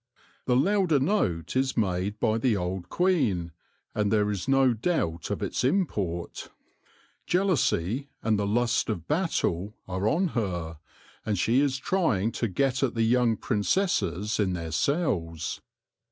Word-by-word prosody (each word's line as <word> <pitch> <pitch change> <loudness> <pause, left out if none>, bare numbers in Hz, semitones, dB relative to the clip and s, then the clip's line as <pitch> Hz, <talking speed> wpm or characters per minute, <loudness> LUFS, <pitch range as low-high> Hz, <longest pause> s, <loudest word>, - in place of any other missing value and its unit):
The 125 - +3
louder 175 +1 +3
note 95 - 0
is 130 0 +1
made 100 0 -1
by 110 -1 +1
the 115 -3 +2
old 90 0 -4
queen, 120 - +1 0.4
and 105 -1 0
there 105 -1 +2
is 100 0 -4
no 135 -2 +4
doubt 110 - -1
of - - -2
its - - -2
import. 105 - -1 0.8
Jealousy 140 - +1
and 110 -2 +2
the 100 - 0
lust 120 +3 +1
of 85 -7 -3
battle 110 - -1
are 95 +2 -1
on 175 +8 +2
her, 90 - -3 0.4
and 105 -2 -1
she 115 +8 +2
is 140 -2 +1
trying 135 - +1
to 115 - -1
get 130 +7 0
at 130 -4 0
the 115 - +2
young 120 -1 +3
princesses 105 - 0
in 95 -3 +1
their 85 -2 -4
cells. 85 - -1
110 Hz, 145 wpm, -27 LUFS, 95-135 Hz, 0.8 s, no